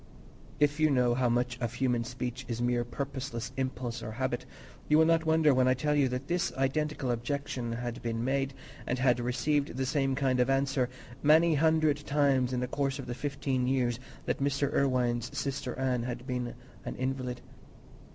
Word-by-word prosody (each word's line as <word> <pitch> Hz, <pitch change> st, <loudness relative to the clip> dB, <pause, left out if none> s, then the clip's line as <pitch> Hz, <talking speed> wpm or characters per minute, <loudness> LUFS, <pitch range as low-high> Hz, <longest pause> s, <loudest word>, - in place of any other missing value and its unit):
If 145 Hz, +1 st, +2 dB
you 155 Hz, 0 st, +4 dB
know 125 Hz, -3 st, +3 dB
how 125 Hz, 0 st, +2 dB
much 125 Hz, +1 st, 0 dB
of 120 Hz, 0 st, -2 dB
human 125 Hz, -2 st, +1 dB
speech 125 Hz, +1 st, -4 dB
is 115 Hz, -1 st, -3 dB
mere 120 Hz, 0 st, +1 dB
purposeless 125 Hz, -1 st, -5 dB
impulse 130 Hz, -3 st, -3 dB
or 110 Hz, -, -5 dB
habit, 125 Hz, +1 st, -2 dB, 0.4 s
you 150 Hz, -, +6 dB
will 160 Hz, -, +6 dB
not 165 Hz, 0 st, +2 dB
wonder 160 Hz, -2 st, +5 dB
when 130 Hz, 0 st, +3 dB
I 130 Hz, -, +4 dB
tell 150 Hz, +4 st, 0 dB
you 145 Hz, -2 st, +3 dB
that 125 Hz, +2 st, -3 dB
this 175 Hz, +2 st, 0 dB
identical 135 Hz, 0 st, 0 dB
objection 120 Hz, 0 st, -3 dB
had 120 Hz, 0 st, -4 dB
been 115 Hz, -1 st, -2 dB
made, 135 Hz, +1 st, 0 dB, 0.3 s
and 125 Hz, -, 0 dB
had 125 Hz, -1 st, +3 dB
received 140 Hz, +3 st, 0 dB
the 130 Hz, -, 0 dB
same 135 Hz, -1 st, +1 dB
kind 130 Hz, -2 st, +1 dB
of 125 Hz, +1 st, +3 dB
answer, 135 Hz, -2 st, +1 dB, 0.3 s
many 160 Hz, +3 st, +5 dB
hundred 155 Hz, -1 st, +3 dB
times 140 Hz, -3 st, +2 dB
in 125 Hz, -1 st, -1 dB
the 125 Hz, -, -1 dB
course 140 Hz, +1 st, -1 dB
of 135 Hz, -, -6 dB
the 120 Hz, -, -4 dB
fifteen 135 Hz, -1 st, -1 dB
years 125 Hz, -2 st, +1 dB, 0.3 s
that -, -, -1 dB
Mr. 140 Hz, 0 st, +1 dB
Irwine's 125 Hz, -3 st, +1 dB
sister 135 Hz, -2 st, -3 dB
Anne 130 Hz, -2 st, 0 dB
had 125 Hz, +1 st, -5 dB
been 125 Hz, -2 st, -3 dB, 0.3 s
an -, -, -5 dB
invalid. 130 Hz, -1 st, -3 dB
130 Hz, 185 wpm, -30 LUFS, 125-140 Hz, 0.4 s, you